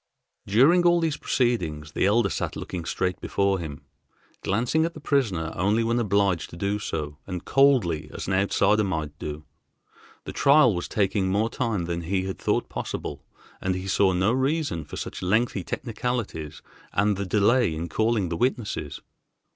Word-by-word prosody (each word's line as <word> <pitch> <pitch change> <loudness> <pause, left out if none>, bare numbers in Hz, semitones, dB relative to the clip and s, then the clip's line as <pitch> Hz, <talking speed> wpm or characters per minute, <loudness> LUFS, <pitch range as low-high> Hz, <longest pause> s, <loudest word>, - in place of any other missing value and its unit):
During 135 - +5
all 175 0 +5
these 160 -3 0
proceedings 85 - -1
the 95 - +1
Elder 105 -1 +3
sat - - -3
looking 85 -3 -5
straight 90 +2 -2
before 100 -1 +1
him, 75 -4 -7 0.6
glancing 120 +10 +1
at 170 +1 -2
the - - -8
prisoner 105 - 0
only 105 +6 +2
when 115 +1 +1
obliged 100 -5 +1
to - - -11
do 100 +3 -1
so, 75 -7 -4
and 90 -2 -5
coldly 100 - +3
as - - -6
an 95 - -1
outsider 100 +2 +3
might 80 -6 -3
do. 75 0 -6 0.8
The - - -7
trial 140 -5 +5
was 90 -1 -3
taking 100 -1 0
more 105 +4 +1
time 110 -8 -1
than 85 0 -3
he 95 +3 -1
had 95 0 -5
thought - - 0
possible, - - -5 0.4
and 95 0 0
he 95 +1 -5
saw 95 0 +3
no 95 +4 +2
reason 135 - 0
for - - -8
such - - -5
lengthy 105 +1 +1
technicalities 105 - -4 0.3
and 105 +1 +2
the 100 - -3
delay 105 0 +2
in 85 +2 -4
calling 110 +1 +1
the 85 - -2
witnesses. 120 -2 -2
100 Hz, 170 wpm, -25 LUFS, 85-120 Hz, 0.8 s, During